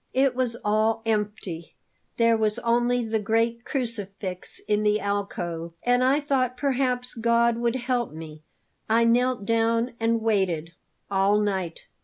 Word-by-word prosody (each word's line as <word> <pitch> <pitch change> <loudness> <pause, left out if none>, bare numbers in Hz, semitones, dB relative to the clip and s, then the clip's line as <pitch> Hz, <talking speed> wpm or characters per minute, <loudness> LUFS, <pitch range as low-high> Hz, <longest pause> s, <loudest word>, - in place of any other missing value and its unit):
It 265 0 +3
was 250 -2 0
all 215 +2 +1
empty; 210 -6 -3 0.4
there 230 -1 +4
was 215 0 +1
only 240 0 +1
the 220 0 0
great 230 +2 0
crucifix 205 -8 -4
in 210 0 +2
the 210 0 +2
alcove. 175 -5 -3
And 245 +1 +3
I 265 +3 +3
thought 260 -4 0
perhaps 255 -2 0
God 235 0 +2
would 235 0 0
help 250 -1 -1
me. 155 -1 -9 0.5
I 230 +1 +4
knelt 245 -1 +2
down 230 +2 +1
and 230 0 +1
waited 185 -7 0 0.4
all 200 +2 +3
night. 190 -5 -2
225 Hz, 140 wpm, -25 LUFS, 205-245 Hz, 0.5 s, there